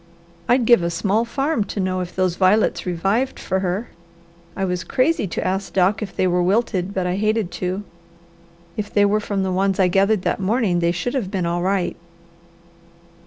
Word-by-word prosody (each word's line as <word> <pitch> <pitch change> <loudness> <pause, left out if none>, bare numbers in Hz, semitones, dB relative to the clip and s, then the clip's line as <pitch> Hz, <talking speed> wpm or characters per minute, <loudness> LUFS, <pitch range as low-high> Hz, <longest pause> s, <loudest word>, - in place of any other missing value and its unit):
I'd 245 -1 +4
give 235 -4 +6
a 170 - 0
small 200 +6 0
farm 270 0 0
to 200 - -5
know 185 -1 -1
if 180 -1 -5
those 185 -2 +1
violets 190 +1 +2
revived 195 +9 0
for 190 - -1
her. 190 +5 -2 0.7
I 195 - -1
was 180 -1 -2
crazy 275 -3 +1
to - - -4
ask 190 +1 -2
Doc 190 +3 +2
if 205 -4 -6
they - - +1
were 180 0 +2
wilted, 195 -1 0
but 190 -2 -2
I 180 +1 -1
hated 215 -2 0
to. 185 +2 -2 0.9
If 205 -1 -4
they 205 -1 +4
were 205 +1 +2
from 200 -2 -2
the 190 - -1
ones 195 +1 0
I 185 -1 +4
gathered 195 +2 +2
that - - 0
morning 195 -2 +1
they 170 0 +2
should 180 +8 -3
have 245 -9 -2
been 190 -3 -2
all 170 +1 -1
right." 190 0 0
195 Hz, 195 wpm, -21 LUFS, 180-215 Hz, 0.9 s, give